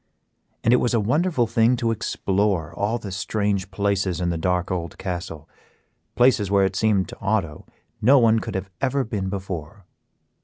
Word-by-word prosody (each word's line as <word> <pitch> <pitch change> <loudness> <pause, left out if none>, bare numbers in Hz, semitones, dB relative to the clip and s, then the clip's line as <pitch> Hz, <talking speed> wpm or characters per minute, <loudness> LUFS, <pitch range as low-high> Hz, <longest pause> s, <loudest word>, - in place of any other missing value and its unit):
And 115 - +4
it - - +6
was 120 -1 +1
a - - +3
wonderful 145 - +1
thing 115 +2 +3
to 115 -1 0
explore 100 -6 -1
all 105 +6 -1
the 100 -4 -7
strange 100 0 -1
places 100 -2 -1
in 90 -1 0
the - - -2
dark 90 +1 0
old 85 -2 -4
castle; 85 -4 -5 0.7
places 120 -5 +3
where 100 -1 +4
it 95 0 -2
seemed 100 -2 +2
to - - -11
Otto 95 -7 -2 0.3
no 135 +6 +6
one 115 -2 +4
could - - -6
have 95 +1 -4
ever 135 0 +1
been 100 -4 -3
before. 95 -1 -6
100 Hz, 175 wpm, -23 LUFS, 95-115 Hz, 0.7 s, it